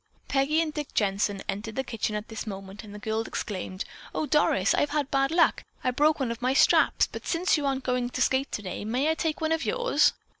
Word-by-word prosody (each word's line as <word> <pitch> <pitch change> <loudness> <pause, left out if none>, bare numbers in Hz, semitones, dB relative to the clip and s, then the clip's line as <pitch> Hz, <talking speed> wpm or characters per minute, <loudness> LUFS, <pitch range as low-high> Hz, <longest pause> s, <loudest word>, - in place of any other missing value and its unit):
Peggy 280 +4 +2
and 310 -2 -4
Dick 295 -2 -5
Jensen 200 -1 0
entered 215 +2 -4
the 265 - -1
kitchen 225 -3 -3
at 210 +1 -4
this 220 0 -6
moment 195 +1 -7
and 210 - -11
the 210 - -8
girl 220 +1 -2
exclaimed: 190 -4 -4 0.3
"Oh, - - 0
Doris, 285 -11 +3
I've 290 - +1
had 290 -2 -1
bad 275 0 +2
luck. 335 +1 +3 0.2
I 255 - +2
broke 300 +4 +3
one 255 -4 -1
of 235 +1 -6
my 255 +2 +1
straps, - - +5
but - - -9
since 350 +2 +2
you 295 -2 -1
aren't 270 -1 -1
going 250 -1 0
to 255 - -5
skate 265 +2 +1
today, 205 -1 -4
may 255 +8 +1
I - - +2
take 320 -1 -2
one 315 0 0
of 325 0 +1
yours?" - - +2
255 Hz, 230 wpm, -27 LUFS, 215-300 Hz, 0.3 s, straps